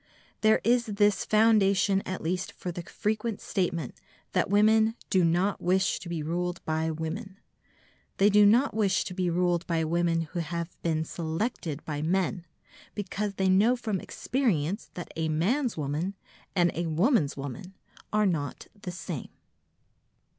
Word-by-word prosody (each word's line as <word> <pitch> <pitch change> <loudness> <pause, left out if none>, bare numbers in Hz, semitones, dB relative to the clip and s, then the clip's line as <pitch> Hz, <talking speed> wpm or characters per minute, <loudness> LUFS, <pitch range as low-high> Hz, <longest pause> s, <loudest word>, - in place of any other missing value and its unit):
There 215 0 +4
is 240 +1 +3
this 205 -1 +2
foundation 205 -3 +4
at 185 - -4
least 180 +3 -2
for 180 - -5
the 175 - -5
frequent 215 +4 -2
statement 170 -7 -2 0.4
that - - +1
women 220 +2 +4 0.2
"do 185 -2 +4
not 175 +4 +1
wish 190 +2 +2
to 180 - -9
be 165 -3 -3
ruled 175 +2 -2
by 160 0 0
women." 165 +6 -5 0.8
They 200 +2 +5
do 210 +1 +6
not 235 +7 +5
wish 205 -3 +2
to 185 - -6
be 180 -1 0
ruled 175 0 +1
by 165 -2 +1
women 170 +1 +1
who 175 - -2
have 170 +1 -4
been 160 -1 0
selected 160 - -3
by 150 -2 -3
men, 175 +1 0 0.5
because 205 0 -3
they 190 0 +1
know 205 +7 +4
from 220 -6 -2
experience 205 - -1
that 175 - -7
a 160 0 -1
man's 220 - 0
woman 155 +6 -2 0.4
and 175 -2 +3
a 170 0 -2
woman's 165 - +2
woman 180 +8 -7 0.4
are 210 0 +3
not 160 -7 -2
the 200 -3 -7
same. 170 -4 -6
185 Hz, 155 wpm, -28 LUFS, 165-210 Hz, 0.8 s, do